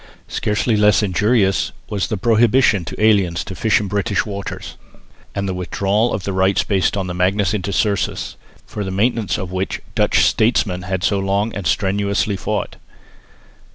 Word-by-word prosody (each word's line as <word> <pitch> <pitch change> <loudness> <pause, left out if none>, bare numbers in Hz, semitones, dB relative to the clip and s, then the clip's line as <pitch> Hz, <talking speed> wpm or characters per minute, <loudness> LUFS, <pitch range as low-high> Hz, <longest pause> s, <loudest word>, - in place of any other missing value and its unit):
Scarcely 105 +2 0
less 105 0 +4
injurious 105 +1 +1 0.2
was 100 -3 -2
the 110 - -2
prohibition 115 -1 +3
to - - -7
aliens 100 -6 +2
to - - -7
fish 110 +3 +2
in 105 - -3
British 100 +1 0
waters, 100 -2 -6 0.6
and 100 0 -2
the 95 - -2
withdrawal 100 +5 0
of 95 - -3
the 100 - -3
rights 95 +1 +2
based 100 0 0
on 95 - -1
the 90 - -4
Magnus 95 +2 +1
Intercursus, 100 0 -1 0.3
for 105 - -5
the 95 - -4
maintenance 110 +3 0
of 95 -3 -5
which 95 +1 -2
Dutch - - +3
statesmen 105 -5 +1
had 95 0 -3
so 100 +2 +2
long 100 +3 0
and 100 -5 -3
strenuously 100 +2 0
fought. 105 +2 -3
100 Hz, 160 wpm, -19 LUFS, 95-105 Hz, 0.6 s, less